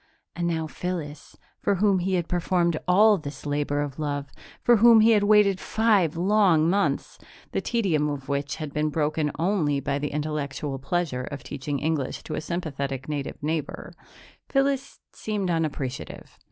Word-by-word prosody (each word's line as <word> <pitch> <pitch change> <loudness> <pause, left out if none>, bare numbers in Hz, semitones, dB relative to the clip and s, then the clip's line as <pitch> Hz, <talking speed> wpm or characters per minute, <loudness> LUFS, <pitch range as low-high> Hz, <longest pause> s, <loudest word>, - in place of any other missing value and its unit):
And 170 0 -1
now 160 -2 -1
Phyllis, 155 -3 -6 0.2
for 200 - +1
whom 195 0 +3
he 185 +1 0
had 175 -2 -1
performed 175 -1 +1
all 205 +3 +5
this 145 -1 -8
labor 145 0 -1
of 145 0 -5
love, 145 -2 -3 0.3
for 240 -1 +5
whom 230 +1 +7
he 225 +1 +6
had 210 -2 +4
waited 205 -2 +4
five 205 -8 +2
long 185 -4 +3
months 200 +3 0 0.3
the - - -1
tedium 175 -11 0
of 140 -2 -5
which 140 +1 -2
had 155 -3 -6
been 155 0 0
broken 150 0 0
only 160 -5 +1
by 140 +1 -2
the 150 0 -2
intellectual 145 -2 -3
pleasure 135 -4 -2
of 140 -2 -7
teaching 145 0 -4
English 150 -2 -2
to 155 - -6
a - - -2
sympathetic 140 -6 -4
native 145 -2 -4
neighbor 155 0 -3 0.6
Phyllis 275 0 0
seemed 205 -4 -2
unappreciative. 150 -6 -4
160 Hz, 160 wpm, -25 LUFS, 145-190 Hz, 0.6 s, whom